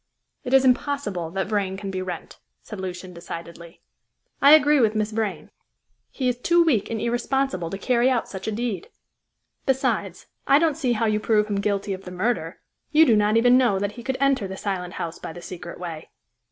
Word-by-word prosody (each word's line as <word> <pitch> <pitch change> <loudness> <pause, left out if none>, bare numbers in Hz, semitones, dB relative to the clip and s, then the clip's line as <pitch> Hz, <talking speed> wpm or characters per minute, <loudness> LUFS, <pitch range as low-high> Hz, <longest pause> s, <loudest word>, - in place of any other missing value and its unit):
"It 250 - -5
is 265 0 +5
impossible 245 - 0
that 190 +3 -2
Vrain 195 -2 -1
can 195 -1 -5
be 185 -1 -3
Wrent," 180 -2 -7 0.2
said 210 - -8
Lucian 180 0 -6
decidedly. 170 0 -9 0.6
"I 280 +2 +8
agree 300 -1 +6
with 220 -3 +3
Miss 215 0 0
Vrain; 215 -2 -3 0.6
he 260 - -2
is 245 -1 0
too 340 +6 +4
weak 255 -12 +1
and 225 - -2
irresponsible 240 -5 -1
to 195 - -5
carry 245 +4 +2
out 250 -3 0
such 190 +1 -7
a - - 0
deed. 220 -4 -3 0.8
Besides, 265 0 0 0.2
I 275 - +6
don't 320 0 +2
see 260 -6 0
how 225 0 0
you 215 -1 +1
prove 215 -1 +2
him 200 -1 0
guilty 200 -1 -1
of 190 0 -8
the - - -7
murder; 180 -2 -2 0.3
you 315 +1 +6
do 230 - +4
not 210 +1 +3
even 245 +2 +5
know 240 -7 +2
that 200 +1 -1
he 240 - -10
could 260 +2 -3
enter 275 -6 +2
the 190 0 -7
Silent 180 -4 -4
House 165 -1 -5
by - - -7
the 175 - -10
secret 175 -1 -8
way." 165 -3 -7
210 Hz, 205 wpm, -24 LUFS, 185-250 Hz, 0.8 s, I